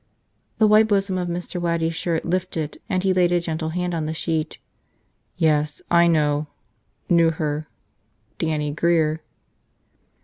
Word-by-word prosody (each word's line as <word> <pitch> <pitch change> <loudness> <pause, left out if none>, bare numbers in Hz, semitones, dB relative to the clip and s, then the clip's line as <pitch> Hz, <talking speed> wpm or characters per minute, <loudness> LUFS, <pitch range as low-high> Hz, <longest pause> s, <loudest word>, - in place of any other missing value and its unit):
The 220 - +4
white 215 +1 +5
bosom 195 -3 +1
of 180 - -2
Mr. 175 +1 -4
Waddy's 165 -1 0
shirt 165 0 -2
lifted 170 -3 -2
and 185 -2 0
he 190 -1 +3
laid 180 -1 +3
a 175 - +3
gentle 160 -1 -3
hand 180 +1 -2
on 160 -2 -2
the 160 - -3
sheet. 160 -1 -2 0.8
"Yes, 150 -3 +1
I 170 0 +5
know 150 -2 +1 0.3
– 110 - -45
knew 170 -1 +4
her. 155 -1 -3 0.7
Dannie 150 -2 -1
Grear." 160 0 +1
165 Hz, 145 wpm, -23 LUFS, 155-180 Hz, 0.8 s, white